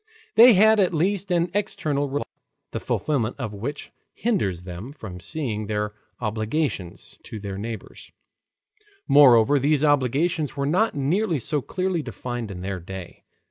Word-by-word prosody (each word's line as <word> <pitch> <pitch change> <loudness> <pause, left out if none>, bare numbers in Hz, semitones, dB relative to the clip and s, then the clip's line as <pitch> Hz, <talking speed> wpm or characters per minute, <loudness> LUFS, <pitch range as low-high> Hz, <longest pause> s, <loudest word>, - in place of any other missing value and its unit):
They 235 +3 +9
had 220 +3 +6
at 180 -3 +2
least 190 +4 0
an 175 -1 +1
external 155 -8 -1
religious 145 +2 -2
law, - - -53
the - - -3
fulfillment 125 -7 -1
of 110 - -4
which 130 +9 -5 0.2
hindered 195 - 0
them 95 +9 -7
from 100 -10 -9
seeing 110 - -4
their 105 0 -2 0.3
obligations 110 - -3
to 110 - -8
their 100 -1 -6
neighbors. 110 +1 -8 1.0
Moreover, 140 -2 +6
these 145 +2 +2
obligations 145 +2 +1
were 140 - 0
not 180 +9 +1
nearly 165 +6 +1
so 145 +3 -1
clearly 185 +2 -2
defined 120 -2 -5
in 90 -2 -7
their 95 0 -4
day. 90 0 -9
140 Hz, 145 wpm, -24 LUFS, 110-165 Hz, 1.0 s, They